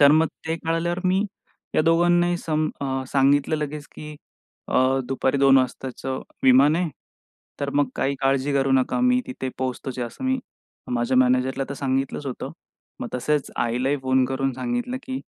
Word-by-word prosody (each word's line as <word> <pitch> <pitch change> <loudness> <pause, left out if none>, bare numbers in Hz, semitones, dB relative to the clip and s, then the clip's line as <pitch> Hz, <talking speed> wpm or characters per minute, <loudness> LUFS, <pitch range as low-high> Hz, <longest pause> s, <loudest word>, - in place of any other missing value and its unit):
तर 140 0 +8
मग 160 +1 +4 0.2
ते 160 +1 -1
कळाल्यावर 165 +2 0
मी 190 +2 +3 0.5
या - - +4
दोघांनाही 175 +2 +3
सम 155 -2 0
अ, 135 -1 -1
सांगितलं 140 +2 +3
लगेच, 150 0 -4
की 150 0 -8 0.5
"अ, 130 +1 +3
दुपारी 135 +1 0
2 135 0 +6
वाजताचं 130 0 -3 0.2
विमान 135 +4 +6
आहे, 175 0 0 0.7
तर 140 - -1
मग 145 -2 +2
काही 140 - 0
काळजी 135 +1 +1
करू 135 0 +2
नका, 130 - +2
मी 250 0 +4
तिथे 245 - -5
पोहोचतोच" 130 0 -4
असं 120 - -5
मी 260 0 +1 0.5
माझ्या 120 +2 +1
मॅनेजरला 130 +1 +2
तर 140 - -3
सांगितलंच 135 +1 -2
होतं. 130 - -5 0.5
मग - - -4
तसेच 145 +3 0
आईलाही 125 +4 0
फोन 130 0 +3
करून 135 +1 -1
सांगितलं, 245 - -2
की 265 0 -4
140 Hz, 160 wpm, -24 LUFS, 130-165 Hz, 0.7 s, तर